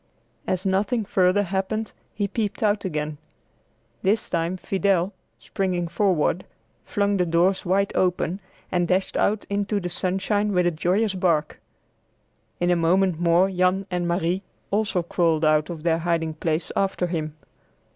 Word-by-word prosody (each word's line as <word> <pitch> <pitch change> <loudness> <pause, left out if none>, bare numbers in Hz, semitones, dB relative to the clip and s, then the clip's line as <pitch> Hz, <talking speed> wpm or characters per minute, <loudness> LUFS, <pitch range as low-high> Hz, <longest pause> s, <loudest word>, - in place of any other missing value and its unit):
As 185 +1 -1
nothing 205 +4 +1
further 190 0 +3
happened, 195 +4 -2 0.2
he 205 -1 0
peeped 210 +1 -2
out 205 -1 +1
again. 150 -4 -3 0.8
This 205 +3 0
time 170 +2 0
Fidel, 195 0 0 0.2
springing 180 -3 -2
forward, 180 -2 +1 0.4
flung 200 0 0
the 180 - +2
doors 175 +4 +2
wide 195 +2 +2
open, 180 0 0 0.3
and 175 -1 +1
dashed 185 +2 0
out 210 0 +1
into 205 +1 -1
the 180 -2 -4
sunshine 195 +4 0
with 180 -1 +3
a 175 - +3
joyous 185 +6 +1
bark. 170 -5 0 1.0
In 175 0 +2
a - - +4
moment 175 +1 +2
more 175 +2 +4
Jan 185 +1 +1
and 175 -1 -1
Marie 175 +1 0 0.3
also 205 -3 +1
crawled 165 -2 +1
out 155 +1 +3
of 165 -3 -6
their 165 -1 +2
hiding 165 -1 0
place 160 +1 -2
after 195 -2 0
him. 155 -3 -3
185 Hz, 145 wpm, -24 LUFS, 170-195 Hz, 1.0 s, a